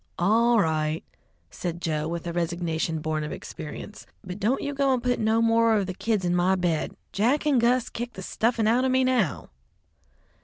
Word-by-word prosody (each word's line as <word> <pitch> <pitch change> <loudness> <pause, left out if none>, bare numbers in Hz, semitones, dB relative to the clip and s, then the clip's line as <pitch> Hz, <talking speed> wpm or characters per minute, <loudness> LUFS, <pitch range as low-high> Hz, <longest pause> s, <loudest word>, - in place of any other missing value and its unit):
"All 230 +6 +3
right," 155 -3 0 0.5
said 175 -1 -4
Joe 155 -3 -2
with 170 0 -4
a 170 - -3
resignation 165 -2 -2
born 155 -1 -2
of 150 - -5
experience, 160 +6 -8 0.2
"but 185 +1 -7
don't 225 +7 0
you 285 - -2
go 275 -1 +2
and 240 - -5
put 250 0 +1
no 220 +1 +2
more 230 0 +4
of 200 - 0
the 185 - -4
kids 210 0 -1
in 175 0 +1
my 180 +2 +3
bed. 175 -4 -1 0.2
Jack 245 +10 +1
and 275 -5 +3
Gus 240 +1 +2
kick 240 +1 -5
the 190 - -8
stuffin' 225 +3 0
out 240 +3 +3
of 260 - +2
me 260 0 +3
now." 245 - 0
200 Hz, 195 wpm, -26 LUFS, 170-240 Hz, 0.5 s, more